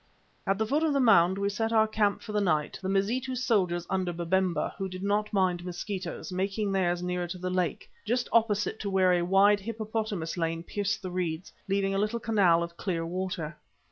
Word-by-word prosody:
At 195 0 +2
the 220 - 0
foot 285 +8 +1
of 320 -2 +2
the 280 - +2
mound 190 -7 +5
we 200 0 0
set 225 +2 -1
our 220 -1 +4
camp 210 -2 0
for 215 - -7
the 210 0 +1
night, 155 -6 0
the 190 - -3
Mazitu 235 +7 0
soldiers 185 -8 +1
under 185 -2 -1
Babemba, 175 +1 0
who 190 -1 -2
did 185 +1 -7
not 205 +1 0
mind 185 -3 +1
mosquitoes, 185 +2 -5
making 195 +3 -1
theirs 180 -2 +1
nearer 180 0 -2
to 180 +2 -6
the 185 0 -3
lake, 180 -2 -1 0.2
just 240 +3 0
opposite 220 -1 +2
to 200 - -3
where 190 -1 +3
a 175 - +2
wide 195 +3 +4
hippopotamus 215 -5 -3
lane 165 0 -1
pierced 205 +2 -2
the 185 - -4
reeds, 175 -1 -3
leaving 195 0 +1
a 195 - 0
little 215 +3 0
canal 195 -7 +3
of 170 0 -8
clear 170 -4 -2
water. 175 -3 -3
195 Hz, 205 wpm, -28 LUFS, 180-210 Hz, 0.2 s, mound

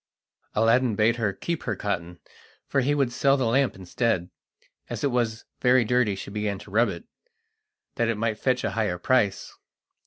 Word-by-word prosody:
Aladdin 115 +1 +3
bade 110 +3 +3
her 110 -4 0
keep 170 - -4
her - - -2
cotton, 90 -4 -4 0.5
for 135 - +1
he 145 +3 +1
would 135 -4 +1
sell 140 +2 +3
the 130 - 0
lamp 130 +3 +2
instead. 95 -1 -1 0.6
As - - -5
it 140 - +2
was 115 -2 -1
very 125 -1 +4
dirty 125 -3 +2
she 95 +1 -8
began 105 -1 -2
to 100 - -13
rub 115 +4 +3
it, - - -6 0.9
that 115 - +2
it 115 -2 0
might 110 -1 -1
fetch 125 -1 +1
a - - -1
higher 105 -5 -1
price. 105 0 +1
115 Hz, 180 wpm, -25 LUFS, 105-125 Hz, 0.9 s, very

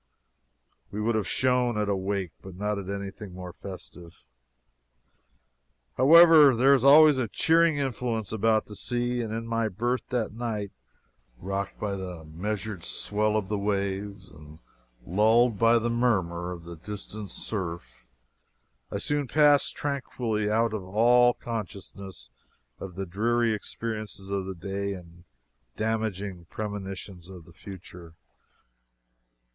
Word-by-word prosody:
We 105 - -6
would 115 +2 +1
have 110 -3 -1
shone 125 -3 +1
at 105 -1 0
a 100 - +1
wake, 95 -2 -2
but 95 -2 -10
not 105 +1 -2
at 95 -1 -7
anything 100 -1 -6
more 90 -1 -8
festive. 90 -4 -11 1.7
However, 155 -1 +8
there 135 +4 +5
is 130 -3 +3
always 145 0 +7
a 120 - 0
cheering 165 +6 +3
influence 120 -5 -2
about 110 0 +2
the 105 - -10
sea; 120 +2 -1
and 110 -2 -4
in 115 +1 -3
my 115 -1 0
berth 120 +6 -2
that 115 -4 -1
night, 110 -4 -4 0.7
rocked 100 +5 -4
by 100 -2 -2
the 90 -4 -7
measured 100 +3 -4
swell 105 +1 0
of 105 -3 -2
the 105 0 -2
waves 100 -1 -3
and 75 0 -14 0.5
lulled 110 +4 +3
by 115 +1 +5
the 115 +1 0
murmur 95 -8 0
of 85 -2 -8
the 85 0 -9
distant 105 +2 -7
surf, 85 - -5 0.8
I - - -3
soon 145 -2 -1
passed 145 +2 +4
tranquilly 120 -7 -2
out 115 +1 +1
of 105 -3 -3
all 120 +5 +4
consciousness 95 - -7 0.5
of 95 -2 -8
the 95 +1 -4
dreary 115 +5 +1
experiences 105 -2 -5
of 95 -1 -2
the 95 - -5
day 100 +3 -3
and 85 -1 -13 0.5
damaging 105 -5 -2
premonitions 95 -2 -6
of 90 -4 -11
the 85 - -17
future. 90 -2 -11
105 Hz, 135 wpm, -27 LUFS, 95-115 Hz, 1.7 s, However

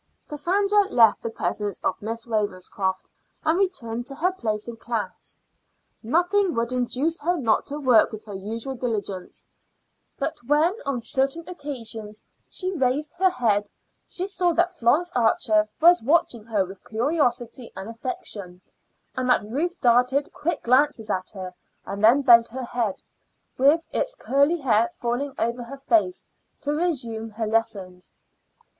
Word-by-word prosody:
Cassandra 395 +7 +2
left 230 -3 +5
the - - -3
presence 205 -3 -3
of 185 - -1
Miss 230 +2 -4
Ravenscroft 190 -3 -2 0.3
and 320 +3 +3
returned 245 -12 -1
to 275 - -5
her 355 +6 +1
place 215 - -3
in 235 -1 -7
class. 230 -2 -5 0.6
Nothing 355 - +2
would 230 +1 -1
induce 255 +6 0
her 345 +4 0
not 230 -7 +1
to 290 +1 -4
work 250 -6 +4
with 215 -1 -9
her 205 - -8
usual 220 +7 -5
diligence, 210 -7 -4 0.7
but - - -3
when 305 +5 +3
on 255 -4 -1
certain 275 +7 -1
occasions 230 -10 -7 0.3
she 370 0 -3
raised 290 0 0
her 380 0 +5
head 210 - +1 0.4
she 365 - -3
saw 365 -3 +1
that 350 +2 +2
Florence 330 +5 +2
Archer 215 -2 +2
was 345 -1 +6
watching 240 -4 +1
her 210 -4 +1
with 190 +1 -12
curiosity 245 -1 -1
and 190 +2 -7
affection, 215 -6 -6 0.6
and 255 -1 -1
that 250 - +4
Ruth 305 - -2
darted 250 +3 +3
quick 320 0 -2
glances 250 -3 +2
at 185 0 -2
her 185 -3 -7 0.3
and 200 +1 -5
then 250 +6 +6
bent 235 -3 +7
her 255 +2 -6
head, 235 -5 -2 0.5
with 290 +5 +4
its - - -1
curly 285 - +2
hair 230 -3 +3
falling 245 +4 -2
over 235 +2 -1
her 240 +4 -8
face, 335 +6 +1 0.4
to 290 - -2
resume 255 -9 -1
her 220 +1 -4
lessons. 195 -5 -2
245 Hz, 150 wpm, -24 LUFS, 220-300 Hz, 0.7 s, bent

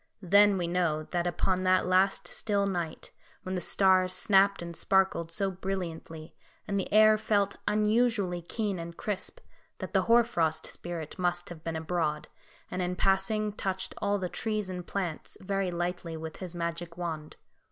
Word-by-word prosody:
Then 200 +2 +5
we 175 - -1
know 170 -3 0
that 175 -1 0
upon 185 +1 0
that 185 0 +3
last 185 0 +2
still 200 0 0
night, 175 -5 -3 0.3
when 185 - -4
the 180 - -1
stars 185 +1 +3
snapped 195 -1 +3
and 170 0 -7
sparkled 190 -4 +2
so 195 +3 0
brilliantly, 175 -4 -5 0.3
and 200 -1 0
the 190 - -3
air 215 0 +6
felt 200 -2 +1
unusually 210 -4 +2
keen 200 +1 -2
and 170 0 -7
crisp, 210 - -4 0.4
that - - -7
the - - +4
Hoar 235 +1 +5
frost 160 -9 0
Spirit 170 -1 -6
must 175 -1 0
have 165 -2 -10
been 165 -1 -3
abroad, 160 -2 -2 0.4
and 180 - -2
in 180 0 -1
passing, 200 +3 +1
touched 190 -2 -3
all 205 0 +1
the 185 -2 -2
trees 210 0 -2
and 180 -1 -6
plants 180 -6 -4
very 195 0 -1
lightly 175 -1 -3
with 160 0 -7
his 180 -2 -7
magic 170 0 -4
wand. 160 -3 -5
185 Hz, 165 wpm, -29 LUFS, 170-200 Hz, 0.4 s, air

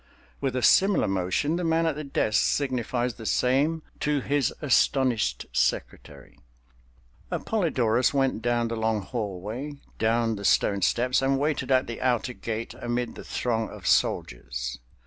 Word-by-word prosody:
With 135 -2 -2
a 125 - -1
similar 195 - +4
motion, 95 - 0
the 180 - -2
man 165 0 +2
at 160 - +1
the 150 +2 -6
desk 110 -6 +1
signifies 125 -3 0
the 115 - -11
same 145 +6 +1 0.2
to 150 -1 +1
his 140 -1 0
astonished 130 - +2
secretary. 70 -3 -2 0.9
Appolidorus 130 - +1
went 135 -5 0
down 120 0 0
the 115 - -2
long 110 -2 0
hallway, 110 +6 -5 0.3
down 115 0 +1
the 100 - -7
stone 100 0 +2
steps 125 +9 +2
and 135 0 +2
waited 140 -2 -1
at 130 -1 +3
the 115 - -7
outer 125 0 0
gate 115 -1 -5
amid 120 0 -2
the - - -10
throng 115 -2 -2
of - - -11
soldiers. - - 0
120 Hz, 145 wpm, -26 LUFS, 110-140 Hz, 0.9 s, similar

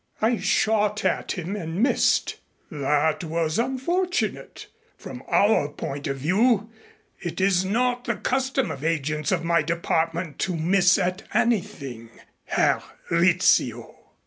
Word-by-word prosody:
"I 230 +2 +2
shot 210 -1 +1
at - - 0
him 180 +2 -4
and 165 -5 -5
missed." 265 - +2 0.3
"That 150 +2 0
was 165 +2 -1
unfortunate 340 +10 -2 0.3
from - - -9
our 200 -8 +3
point 145 0 -6
of 135 -1 -2
view. 210 - +2 0.5
It 170 0 -5
is 190 -1 +3
not 245 +5 0
the - - -1
custom 265 -1 -1
of 135 - -7
agents 155 -2 -1
of 175 -3 0
my 170 0 +2
department 165 0 -2
to 185 - -1
miss 180 +3 +3
at 185 0 -1
anything, 135 - -1 0.4
Herr - - +1 0.3
Rizzio. 170 +1 +2
180 Hz, 125 wpm, -24 LUFS, 160-220 Hz, 0.5 s, our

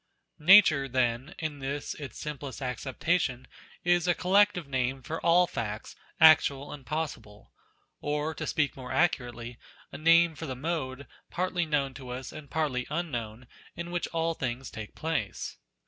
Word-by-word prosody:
Nature, 155 -5 +7
then, 130 +5 0
in 155 -3 -4
this 140 +1 -3
its 140 -6 -8
simplest 145 -3 -6
acceptation, 130 +1 -1 0.4
is 175 0 +3
a 175 - +3
collective 185 -3 +3
name 130 0 -1
for 160 +6 -4
all 175 +1 +5
facts, 105 -9 -5 0.2
actual 145 -3 +6
and 135 -3 -11
possible: 120 -10 -5 0.5
or 150 +2 -1
(to - - -5
speak 145 -2 0
more 130 -1 -8
accurately) 120 -8 -1 0.3
a - - -8
name 165 +1 +5
for 160 +1 -7
the 130 - -4
mode, 140 -2 -3 0.2
partly 180 -1 -1
known 140 -3 0
to 130 -2 -10
us 125 +1 -6
and 155 -3 -10
partly 145 -6 -1
unknown, 125 -8 -4 0.3
in 170 0 -6
which 175 -1 -1
all 165 0 0
things 130 -3 -4
take 110 -2 -8
place. 155 -10 -3
145 Hz, 150 wpm, -29 LUFS, 130-165 Hz, 0.5 s, Nature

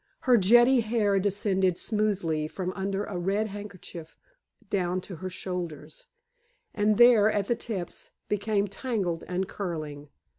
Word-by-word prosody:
Her 250 -2 +4
jetty 240 +5 +6
hair 215 -3 +1
descended 190 -2 +1
smoothly 195 -8 0
from 185 +3 -4
under 195 +1 -2
a 190 -4 -4
red 200 +5 0
handkerchief 190 -5 -9 0.5
down 185 -2 0
to 180 -2 -9
her 185 +4 -5
shoulders, 170 -5 -6 0.7
and 210 0 +2
there, 235 -3 +7
at 205 -2 -1
the 240 - +2
tips, 195 -7 -5 0.2
became 205 0 0
tangled 195 -5 -2
and 180 +1 -2
curling. 155 -7 -5
195 Hz, 135 wpm, -27 LUFS, 180-210 Hz, 0.7 s, there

